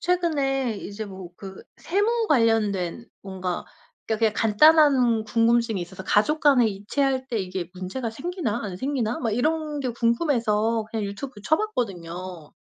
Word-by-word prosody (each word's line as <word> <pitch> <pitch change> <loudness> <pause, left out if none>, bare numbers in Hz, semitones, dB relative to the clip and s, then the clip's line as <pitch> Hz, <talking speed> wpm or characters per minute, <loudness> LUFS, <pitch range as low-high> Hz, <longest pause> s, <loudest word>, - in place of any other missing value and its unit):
최근에 280 - 0
이제 205 +2 -6
뭐 190 -3 -9
그 190 0 -10
세무 440 +5 0
관련된 225 - +1 0.2
뭔가 185 -2 -4 0.4
그니까 220 -1 -1
그냥 220 -2 +2
간단한 250 0 +5
궁금증이 230 -2 +2
있어서 190 +2 -8
'가족 255 +11 +2
간에 275 -6 +5
이체할 260 +6 -1
때 235 - -2
이게 185 -2 -4
문제가 190 +7 -4
생기나 265 - -3
안 190 -4 -5
생기나.' 250 -3 -1
막 230 -3 -1
이런 300 +5 -1
게 255 - -1
궁금해서 230 -3 +1
그냥 220 -2 -2
유튜브 205 +3 -6
쳐봤거든요. 185 - -3
230 Hz, 315 characters per minute, -24 LUFS, 200-275 Hz, 0.4 s, 간단한